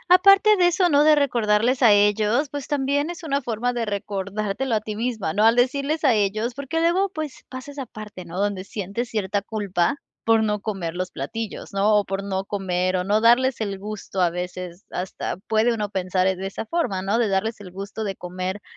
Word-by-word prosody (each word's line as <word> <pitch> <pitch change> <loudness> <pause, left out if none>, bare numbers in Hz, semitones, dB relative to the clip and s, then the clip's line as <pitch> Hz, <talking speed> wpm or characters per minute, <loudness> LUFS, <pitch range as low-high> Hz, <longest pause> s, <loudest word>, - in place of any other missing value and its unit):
aparte 395 +3 +6
de 355 -1 +5
eso, 355 +1 +3
¿no?, 290 -1 +5
de 305 0 +6
recordarles 240 -3 +2
a 235 -4 +7
ellos, 210 +7 +3
pues, 285 -2 -5
también 285 +1 0
es 345 -1 -7
una 280 -3 0
forma 245 0 -2
de 240 -1 -1
recordártelo 205 +3 -2
a 215 - 0
ti 215 0 -5
misma, 220 -7 -2
¿no?, 210 - +2
al 225 +1 +6
decirles 280 +5 +1
a 265 -5 +5
ellos, 215 +3 0
porque 280 +4 -3
luego, 350 +4 +2
pues, 310 -6 -6
pasa 255 +2 -8
esa 275 -3 -6
parte, 210 -4 -9
¿no?, 170 +2 -6
donde 200 -2 -1
sientes 205 +4 -4
cierta 205 -2 -1
culpa 200 -2 -1 0.3
por 225 -1 +4
no 210 -1 0
comer 195 -6 -3
los 185 +1 -3
platillos, 215 +13 -6
¿no?, 205 +2 +3
o 205 - +1
por 195 +1 -3
no 190 -1 -2
comer 185 -2 -1
o 180 - -1
no 205 +3 +2
darles 240 +2 +4
el 200 -3 -3
gusto, 205 -2 -5
a 175 - +4
veces 180 +1 -6
hasta 180 -1 -4
puede 220 +2 +3
uno 210 -2 -2
pensar 185 -1 0
en 190 0 -1
esa 195 +3 -4
forma, 215 - -1
¿no?, 200 +4 0
de 235 -2 +2
darles 210 +4 -1
el 185 -3 -10
gusto 200 +3 -6
de 195 -2 -3
comer 185 +3 -5
215 Hz, 210 wpm, -23 LUFS, 195-255 Hz, 0.3 s, a